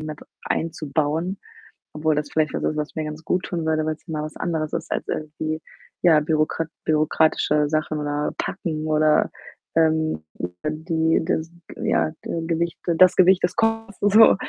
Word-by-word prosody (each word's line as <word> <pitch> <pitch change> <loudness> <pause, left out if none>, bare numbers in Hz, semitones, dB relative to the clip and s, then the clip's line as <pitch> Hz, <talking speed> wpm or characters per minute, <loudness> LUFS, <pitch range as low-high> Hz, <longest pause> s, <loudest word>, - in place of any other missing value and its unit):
mit 155 -1 -6 0.2
einzubauen, 160 +3 -1 0.6
obwohl 155 0 +1
das 150 -1 -2
vielleicht 155 -1 +1
was - - -2
ist, 155 - 0
was 150 +1 -3
mir 155 -1 -2
ganz 150 +1 -7
guttun 175 -2 -1
würde, 155 -1 +1
weil's 155 0 -4
mal 155 -2 -3
was 155 - -7
anderes 160 -3 -2
ist - - -4
als - - -2
irgendwie, 155 +1 -3 0.4
ja, 160 -4 +6
bürokrat 155 +1 0 0.2
bürokratische 155 -1 +2
Sachen 155 0 -1
oder 145 0 -1
packen 155 -2 -3
oder, 155 0 +3 0.4
ähm, 160 - +2 0.4
die 160 +1 +1
das, 165 -1 -1 0.3
ja, - - +1
Ge 165 -1 -3
Gewicht 170 0 -1 0.2
das 185 0 +7
Gewicht 185 0 +5
des 180 0 +1
Koffers 225 -2 0
so. 205 +2 +7
155 Hz, 155 wpm, -23 LUFS, 155-165 Hz, 0.6 s, das